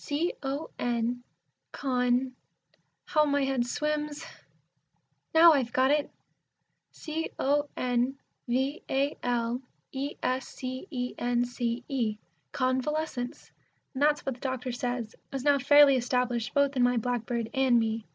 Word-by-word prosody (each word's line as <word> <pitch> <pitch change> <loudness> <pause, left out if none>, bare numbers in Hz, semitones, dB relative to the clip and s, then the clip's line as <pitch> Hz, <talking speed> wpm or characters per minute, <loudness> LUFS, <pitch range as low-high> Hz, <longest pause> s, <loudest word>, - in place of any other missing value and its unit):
C 310 +5 -1
O 280 +3 -4
N 240 0 -1 0.5
con 250 -1 +1 0.7
how 305 -2 +3
my 285 -1 +2
head 265 -3 0
swims! 300 +2 -2 1.1
Now 325 +1 +8
I've 260 -5 0
got 260 +1 +3
it! 295 0 +1 0.8
C 320 +1 -4
O 290 +1 +1
N 250 +1 0 0.3
V 265 +5 0
A 275 +2 +1
L 240 0 -1 0.3
E 275 +2 -4
S 255 0 0
C 255 +6 -6
E 250 -4 -3
N 245 0 +1
C 240 0 -3
E. 230 -6 -1 0.3
Convalescence! 260 0 -2 0.4
And 265 - -5
that's 295 0 +3
what 270 - -1
the 245 - -16
doctor 260 -1 -3
says 245 -2 -3 0.2
is 270 -2 -4
now 285 -1 +4
fairly 290 +1 +7
established 245 -1 -1
both 280 0 +3
in 255 - +2
my 245 0 +3
blackbird 235 -1 -2
and 265 -3 +4
me. 225 -1 -2
260 Hz, 140 wpm, -29 LUFS, 245-285 Hz, 1.1 s, Now